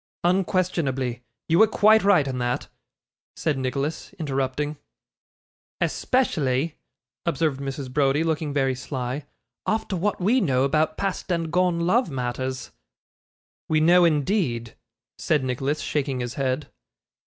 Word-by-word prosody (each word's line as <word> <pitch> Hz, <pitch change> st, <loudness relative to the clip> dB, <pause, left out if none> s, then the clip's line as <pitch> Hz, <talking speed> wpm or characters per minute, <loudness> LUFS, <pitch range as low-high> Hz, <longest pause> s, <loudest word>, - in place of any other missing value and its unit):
'Unquestionably. 170 Hz, -9 st, 0 dB, 0.3 s
You 165 Hz, +2 st, +3 dB
were 220 Hz, -, +8 dB
quite 215 Hz, 0 st, +5 dB
right 185 Hz, -8 st, +4 dB
in 130 Hz, -1 st, -3 dB
that,' 125 Hz, 0 st, -2 dB, 0.7 s
said 155 Hz, -3 st, 0 dB
Nicholas, 135 Hz, +4 st, -3 dB
interrupting. 145 Hz, 0 st, -2 dB, 1.0 s
'Especially,' 155 Hz, -, 0 dB, 0.5 s
observed 160 Hz, -5 st, 0 dB
Mrs. 135 Hz, -1 st, -5 dB
Browdie, 145 Hz, +2 st, +2 dB
looking 160 Hz, -2 st, -1 dB
very 135 Hz, -2 st, +1 dB
sly, 130 Hz, +1 st, -4 dB, 0.4 s
'after 215 Hz, -3 st, 0 dB
what 195 Hz, +3 st, -1 dB
we 225 Hz, +8 st, +3 dB
know 130 Hz, -8 st, +2 dB
about 155 Hz, +3 st, +1 dB
past 195 Hz, -1 st, -2 dB
and 165 Hz, -2 st, -1 dB
gone 180 Hz, -1 st, +2 dB
love 185 Hz, +5 st, +2 dB
matters.' 130 Hz, 0 st, -3 dB, 1.0 s
'We 155 Hz, -1 st, +3 dB
know, 175 Hz, +3 st, +6 dB
indeed!' 150 Hz, -, +1 dB, 0.5 s
said 150 Hz, -4 st, +1 dB
Nicholas, 135 Hz, +4 st, -1 dB
shaking 140 Hz, -3 st, -1 dB
his 120 Hz, -1 st, -3 dB
head. 135 Hz, +1 st, -2 dB
150 Hz, 120 wpm, -24 LUFS, 130-175 Hz, 1.0 s, were